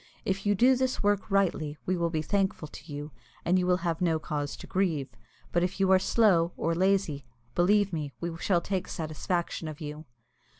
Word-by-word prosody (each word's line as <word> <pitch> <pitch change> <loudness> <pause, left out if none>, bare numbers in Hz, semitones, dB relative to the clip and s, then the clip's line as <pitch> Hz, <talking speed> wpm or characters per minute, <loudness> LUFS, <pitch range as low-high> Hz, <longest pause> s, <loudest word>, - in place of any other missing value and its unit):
If 195 +1 -1
you 205 - +4
do 250 +6 +5
this 255 -2 -1
work 205 0 +1
rightly, 170 -7 +1
we 185 - +1
will 170 -1 0
be 160 -2 -1
thankful 190 -3 0
to 150 +1 -12
you, 145 +1 -6 0.3
and 180 +2 +3
you 180 - 0
will 180 0 +4
have 165 -1 -1
no 165 -3 +2
cause 150 -2 -3
to - - -10
grieve; 170 -8 0 0.4
but 175 - +2
if 180 +2 -1
you 190 -1 +3
are 190 - +7
slow 185 -6 +3
or 165 - 0
lazy, 185 -5 +1 0.3
believe 200 +3 +3
me 150 -3 -3
we 170 -1 -3
shall 175 -3 +2
take 190 -1 -2
satisfaction 165 +1 -3
of 155 -1 -7
you." 150 0 -7
175 Hz, 200 wpm, -29 LUFS, 155-195 Hz, 0.4 s, are